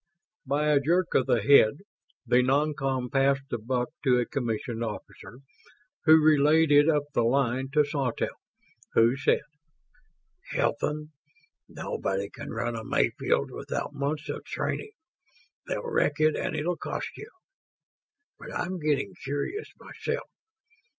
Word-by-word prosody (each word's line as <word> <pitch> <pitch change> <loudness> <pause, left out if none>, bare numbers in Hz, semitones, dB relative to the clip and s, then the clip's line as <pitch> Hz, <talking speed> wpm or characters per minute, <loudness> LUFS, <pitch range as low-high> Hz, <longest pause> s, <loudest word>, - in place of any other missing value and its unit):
By 150 +3 +1
a 145 -2 +5
jerk 170 +5 +1
of 130 - +2
the 115 -4 +2
head, 110 -3 +6 0.5
the 125 +1 +4
non 145 +4 +2
com 135 -3 -2
passed 135 0 +2
the 120 - -2
buck 125 +2 -1
to 130 -3 +4
a 120 - +1
commissioned 120 -2 -3
officer, 115 +3 -8 0.6
who 160 0 +8
relayed 155 +1 +4
it 145 +2 +6
up 150 -2 +2
the - - +2
line 130 +2 +1
to 150 0 +4
Sawtelle, 140 -4 -2 0.5
who 115 +3 +4
said, 140 - +1 1.1
"Hilton, 150 +1 -1 0.6
_no_body 100 +1 -3
can - - -8
run 120 +1 -3
a 110 - -5
Mayfield - - 0
without - - -4
months 145 +3 -3
of - - -5
training. 430 - -4 0.7
They'll - - -3
wreck 150 - +1
it 155 0 +4
and - - -2
it'll 165 +3 -1
cost - - -5
you... 435 - -10 1.1
but - - -9
I'm 185 - -3
getting 155 +5 0
curious 145 - -3
myself. - - -5
140 Hz, 135 wpm, -27 LUFS, 125-150 Hz, 1.1 s, who